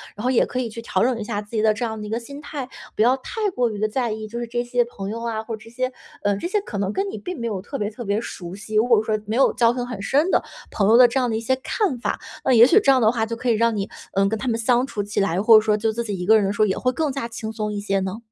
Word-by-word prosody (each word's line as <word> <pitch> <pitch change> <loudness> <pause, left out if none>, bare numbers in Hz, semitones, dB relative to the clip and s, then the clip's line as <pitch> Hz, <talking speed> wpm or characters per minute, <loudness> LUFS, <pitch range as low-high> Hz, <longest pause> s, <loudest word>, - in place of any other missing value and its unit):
然 210 - -7
后 255 - +2
也 250 - +3
可 255 - -4
以 240 - -2
去 230 +1 -8
调 230 - 0
整 245 -1 +1
一 215 - -3
下 205 0 -3
自 210 - -16
己 215 - +2
的 215 -1 +4
这 235 +3 -3
样 220 -1 -4
的 - - -6
一 - - -7
个 225 - -1
心 280 +5 -10
态， 285 -3 -6 0.3
不 - - 0
要 245 +4 +5
太 420 - -2
过 245 -1 +2
于 210 -2 -6
地 215 - +1
在 235 0 -1
意， 215 0 -5
就 235 +3 -6
是 240 - -4
这 240 +1 -2
些 245 0 +1
朋 200 -4 -7
友 230 +1 -5
啊， 220 -2 -2
或 225 0 -5
者 220 - -15
这 - - -13
些， 255 +2 -2 0.3
嗯， 205 -1 +1
这 345 - -3
些 415 +3 +1
可 220 - -6
能 195 -1 -1
跟 395 0 -1
你 - - -6
并 360 -5 -6
没 235 - -2
有 195 -4 -3
特 275 +7 -6
别 205 - -1
特 225 +3 -8
别 200 +1 0
熟 175 -5 -7
悉， 215 +2 -8
如 215 +2 +4
果 230 -4 +5
说 215 -1 0
没 215 +2 -3
有 270 - +4
交 235 0 +3
情 245 -1 -3
很 225 -5 -6
深 290 - +2
的 - - +3 0.3
朋 200 -1 +1
友 230 - +7
的 250 - +8
这 245 +3 0
样 250 -2 +1
的 220 - -1
一 - - -2
些 260 +3 +1
看 275 - -1
法。 - - -2 0.2
那 265 - +2
也 235 -1 +9
许 420 - +6
这 275 - +5
样 260 -1 +4
的 220 0 +5
话 225 -2 0
就 230 +1 -4
可 245 +1 -2
以 - - +5
让 230 +1 +2
你， 200 -1 -3 0.2
嗯， 195 0 +3
跟 220 - -1
他 260 - -4
们 230 -1 0
相 245 +3 +2
处 210 -6 -4
起 205 +1 -3
来， 195 -2 +1
或 225 +2 +7
者 215 - +5
说 210 -1 +1
就 220 +1 0
自 235 +2 -3
己 205 -4 -4
一 180 - -4
个 220 +3 +6
人 205 - +1
的 195 - 0
时 205 - -2
候 - - +6
也 190 - -1
会 255 - +1
更 300 +2 -1
加 270 -3 -3
轻 225 -1 -6
松 210 -1 -3
一 205 - -3
些 195 -1 0
呢？ 190 +2 -3
225 Hz, 380 characters per minute, -22 LUFS, 210-250 Hz, 0.3 s, 也